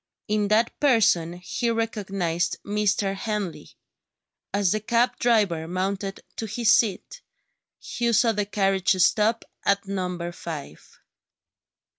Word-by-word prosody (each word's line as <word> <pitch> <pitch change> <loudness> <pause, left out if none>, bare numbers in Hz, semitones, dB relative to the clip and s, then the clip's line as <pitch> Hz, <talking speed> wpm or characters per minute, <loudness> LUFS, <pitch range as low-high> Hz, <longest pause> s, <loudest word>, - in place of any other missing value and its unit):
In 210 -1 +1
that 220 +3 +1
person 210 - +3
he 180 +7 -3
recognised 195 -7 -1
Mr. 205 -1 0
Henley. 205 -3 -4 0.8
As 200 -3 +1
the 215 - +1
cab 235 +3 +1
driver 205 -9 +2
mounted 195 +2 -3 0.2
to 225 - -3
his 230 +2 +2
seat, 225 - 0 0.6
Hugh 235 -1 -2
saw 230 +1 +4
the 205 -2 -2
carriage 195 -2 +1
stop 215 +5 +3 0.2
at 200 0 +1
Number 180 -3 -3
Five. 155 - -9
200 Hz, 115 wpm, -25 LUFS, 185-225 Hz, 0.8 s, saw